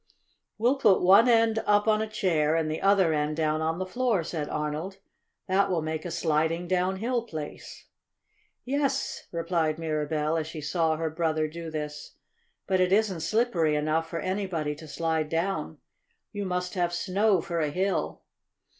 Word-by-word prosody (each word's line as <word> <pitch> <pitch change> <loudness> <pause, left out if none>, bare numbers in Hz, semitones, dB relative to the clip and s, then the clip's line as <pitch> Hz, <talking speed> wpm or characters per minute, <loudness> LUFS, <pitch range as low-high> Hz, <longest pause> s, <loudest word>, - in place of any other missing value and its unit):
"We'll 245 +5 +2
put 210 -9 +4
one 200 +7 +7
end 225 -1 +4
up 205 +1 +3
on 215 0 +3
a 220 - -3
chair, 165 -7 +1
and 160 -1 0
the 155 - -3
other 195 -4 +4
end 150 0 -1
down 155 -1 0
on 160 +1 -1
the 185 - -2
floor," 230 -2 0
said 155 -2 -4
Arnold. 150 +6 -3 0.5
"That 195 +1 +2
will 170 -4 0
make 155 +1 -4
a - - -3
sliding 165 +1 0
downhill 190 +7 0
place." 155 -10 -8 0.8
"Yes," 275 +1 -1
replied 165 -2 0
Mirabell, 155 0 -1
as 160 -1 -2
she 160 0 -7
saw 160 +1 0
her 160 0 -2
brother 155 -1 0
do 165 +1 -7
this. 150 -1 -6 0.5
"But 190 -1 +1
it 185 0 +2
isn't 200 -3 +2
slippery 170 -4 +1
enough 155 +2 0
for 165 - -3
anybody 185 -6 -2
to 155 - -11
slide 160 0 -1
down. 165 - -2 0.5
You 205 -1 -4
must 180 -1 -2
have 175 -3 0
snow 195 +2 +2
for 170 +1 -3
a 155 -2 0
hill." 190 +5 -1
170 Hz, 165 wpm, -27 LUFS, 155-195 Hz, 0.8 s, one